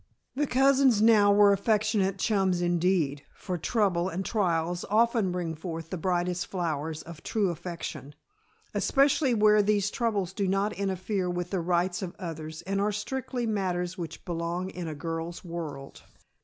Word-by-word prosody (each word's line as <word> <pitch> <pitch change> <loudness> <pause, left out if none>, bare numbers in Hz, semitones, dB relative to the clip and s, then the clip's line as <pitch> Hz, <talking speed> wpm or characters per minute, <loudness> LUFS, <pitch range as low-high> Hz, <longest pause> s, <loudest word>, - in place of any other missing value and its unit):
The 290 +2 0
cousins 265 -3 +4
now 215 -2 +6
were 205 0 +6
affectionate 205 -1 +1
chums 190 -3 +1
indeed, 175 -4 +1
for 185 - -4
trouble 185 -1 +1
and 190 +2 -4
trials 175 -4 0
often 225 -2 +3
bring 175 -2 -2
forth 165 0 -6
the 185 - -2
brightest 180 0 -1
flowers 160 -4 -3
of 165 -1 -11
true 210 -4 0
affection, 165 -4 -7 0.6
especially 275 -2 +3
where 210 0 +5
these 205 -1 +1
troubles 205 -6 -1
do 195 0 -1
not 195 +2 +1
interfere 190 -1 -2
with 175 0 -3
the 190 - 0
rights 175 +1 0
of 180 -2 -5
others 160 -3 -6
and 195 +1 -1
are 210 +1 +1
strictly 250 +4 -3
matters 185 -4 -1
which 170 -4 -7
belong 175 +2 -3
in 175 -2 -6
a 155 - -4
girl's 165 +2 -5
world. 155 -5 -7
185 Hz, 155 wpm, -28 LUFS, 170-210 Hz, 0.6 s, now